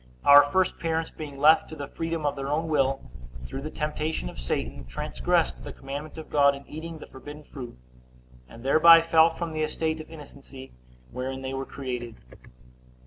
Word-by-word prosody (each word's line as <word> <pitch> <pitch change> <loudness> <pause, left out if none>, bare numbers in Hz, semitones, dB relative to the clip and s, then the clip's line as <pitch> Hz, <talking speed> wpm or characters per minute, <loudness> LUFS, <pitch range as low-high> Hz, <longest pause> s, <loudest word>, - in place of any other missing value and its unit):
Our 145 0 +10
first 180 +6 0
parents 165 -1 -1
being 145 -3 -8
left 155 +3 +5
to 160 - -8
the 145 -2 -6
freedom 165 -1 -4
of 145 0 0
their 135 -1 -5
own 160 +3 -1
will, 135 -3 0 0.3
through 135 - -6
the 155 - -5
temptation 150 - -3
of - - -11
Satan, 60 0 -3
transgressed 60 0 -1
the - - -7
commandment 140 +4 -7
of 160 - -9
God 140 -1 +4
in 140 - -12
eating 160 +2 -7
the - - -10
forbidden 145 +3 -11
fruit; 125 - -9 0.7
and 115 - -13
thereby 165 +4 +7
fell 165 0 +5
from 165 0 -5
the 155 - -2
estate 160 +1 -1
of 155 - -13
innocency 140 -4 -12 0.4
wherein 130 +1 -5
they 130 0 -4
were 135 0 -4
created. 125 -4 -5
145 Hz, 180 wpm, -26 LUFS, 135-160 Hz, 0.7 s, Our